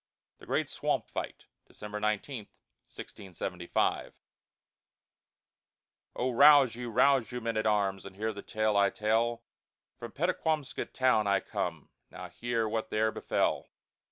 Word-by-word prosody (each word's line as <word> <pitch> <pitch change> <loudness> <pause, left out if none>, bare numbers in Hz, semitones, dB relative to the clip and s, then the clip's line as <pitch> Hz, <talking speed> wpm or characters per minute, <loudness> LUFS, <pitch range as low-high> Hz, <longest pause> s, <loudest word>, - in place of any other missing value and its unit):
THE - - -15
GREAT - - 0
SWAMP - - -1
FIGHT - - -5 0.2
[December 105 0 -7
19, 105 +2 -2 0.4
1675] 95 -4 -3
I - - -22 2.0
Oh, 130 +1 -1
rouse 140 -1 +7
you, 120 0 -5
rouse 125 0 +3
you, 125 - -4
men 115 -1 -3
at 110 0 0
arms, 100 -2 +1
And 100 -1 -10
hear 110 +2 -2
the 100 - -8
tale 110 0 -1
I 100 -1 +4
tell, 115 +3 0 0.6
From 120 -1 -7
Pettaquamscut 155 -4 -2
town 125 -5 +2
I 100 0 +3
come, - - -4 0.2
Now - - -9
hear 115 -2 -2
what 110 0 -3
there 110 +1 +1
befell. - - -1
110 Hz, 135 wpm, -30 LUFS, 105-125 Hz, 2.0 s, rouse